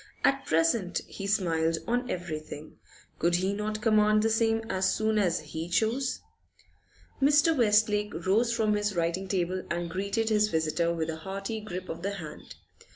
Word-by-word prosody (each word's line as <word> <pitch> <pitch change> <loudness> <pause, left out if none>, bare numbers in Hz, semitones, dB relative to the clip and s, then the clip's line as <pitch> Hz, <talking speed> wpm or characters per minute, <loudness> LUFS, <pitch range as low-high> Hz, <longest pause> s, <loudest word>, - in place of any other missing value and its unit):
At 275 0 +2
present 165 +4 +1
he 195 - -6
smiled 165 -5 +1
on 245 +2 -1
everything. 155 -4 -6 0.4
Could 170 +1 +2
he 190 +3 0
not 215 +1 -3
command 215 -1 +4
the 225 - +2
same 225 0 +2
as 190 -3 +1
soon 220 0 +1
as 175 -5 +1
he 160 +2 -6
chose? 230 +8 0 1.0
Mr. 295 +3 +5
Westlake 210 -3 +3
rose 225 +5 +3
from 220 -2 +1
his 205 -1 -1
writing 170 +3 -1
table 185 -1 -1
and 170 0 -3
greeted 200 +5 -1
his 210 -1 +3
visitor 160 -1 0
with 165 -1 -2
a 160 - -6
hearty 195 +6 -5
grip 185 -3 -6
of 165 - -6
the 200 +2 -3
hand. 160 -6 -9
200 Hz, 160 wpm, -28 LUFS, 170-220 Hz, 1.0 s, Mr